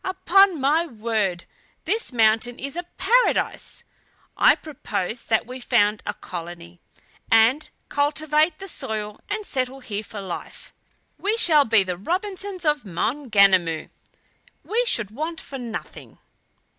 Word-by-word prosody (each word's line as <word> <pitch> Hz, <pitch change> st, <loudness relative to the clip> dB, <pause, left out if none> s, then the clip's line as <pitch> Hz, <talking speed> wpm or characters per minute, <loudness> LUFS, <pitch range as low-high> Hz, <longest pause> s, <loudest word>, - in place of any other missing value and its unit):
Upon 375 Hz, -1 st, +3 dB
my 305 Hz, +6 st, +2 dB
word, 215 Hz, -, -2 dB, 0.4 s
this 450 Hz, -6 st, -1 dB
mountain 225 Hz, 0 st, +2 dB
is 275 Hz, +2 st, -5 dB
a 350 Hz, 0 st, -5 dB
paradise! 485 Hz, +5 st, +1 dB, 0.5 s
I -, -, +6 dB
propose 245 Hz, -, -5 dB
that 220 Hz, 0 st, +1 dB
we 255 Hz, +2 st, -8 dB
found 215 Hz, -4 st, +2 dB
a 210 Hz, -, -2 dB
colony, 175 Hz, 0 st, -9 dB, 0.5 s
and 240 Hz, +7 st, +4 dB, 0.2 s
cultivate 305 Hz, +2 st, +1 dB
the 390 Hz, -, -9 dB
soil 215 Hz, -, -5 dB
and 420 Hz, 0 st, -3 dB
settle 260 Hz, -2 st, -2 dB
here 210 Hz, -5 st, -4 dB
for 210 Hz, 0 st, -8 dB
life! 190 Hz, -3 st, -8 dB, 0.5 s
We 425 Hz, +3 st, 0 dB
shall 315 Hz, -10 st, +6 dB
be 225 Hz, -3 st, +4 dB
the 180 Hz, -2 st, -4 dB
Robinsons 375 Hz, -, -4 dB
of 300 Hz, -1 st, +2 dB
Maunganamu. 200 Hz, -, +2 dB, 0.7 s
We 465 Hz, +3 st, 0 dB
should 220 Hz, -, +1 dB
want 315 Hz, +7 st, -4 dB
for 270 Hz, -, -8 dB
nothing." 230 Hz, -3 st, -8 dB
250 Hz, 130 wpm, -23 LUFS, 210-330 Hz, 0.7 s, I